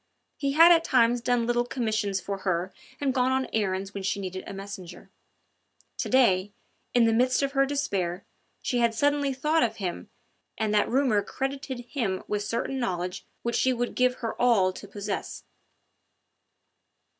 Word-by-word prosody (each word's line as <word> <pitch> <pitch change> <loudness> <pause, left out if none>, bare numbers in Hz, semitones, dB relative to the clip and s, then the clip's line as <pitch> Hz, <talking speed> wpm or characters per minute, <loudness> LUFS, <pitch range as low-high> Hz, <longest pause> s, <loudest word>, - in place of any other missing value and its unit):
He 280 -1 -1
had 330 +3 +8
at 330 -1 +5
times 245 -4 +3
done 245 -1 +1
little 240 0 +1
commissions 215 -5 -1
for 195 +2 -5
her 185 -1 -1 0.3
and 275 -2 0
gone 255 0 +2
on 260 0 +1
errands 195 -2 -1
when 200 - -5
she 190 +1 -1
needed 185 -1 -5
a - - -6
messenger; 195 -2 -9 0.9
to - - -2
day, 205 -7 +3 0.4
in 240 -1 +6
the 225 - +3
midst 255 +4 +2
of 275 - 0
her 275 0 +2
despair, 195 - -2 0.4
she 245 - 0
had 235 -1 +2
suddenly 285 +2 +2
thought 300 +5 +1
of 235 - +1
him 185 -4 -5 0.5
and 215 -1 0
that 210 - +3
rumour 250 -5 +2
credited 270 +1 -4
him 235 -7 -3
with 210 -1 -1
certain 235 +5 -2
knowledge 180 -3 -3 0.2
which 235 0 -1
she 260 - +3
would 245 0 -2
give 250 0 +2
her 230 -3 -4
all 205 -7 +4
to 205 - -10
possess. 200 0 -5
235 Hz, 165 wpm, -27 LUFS, 195-260 Hz, 0.9 s, had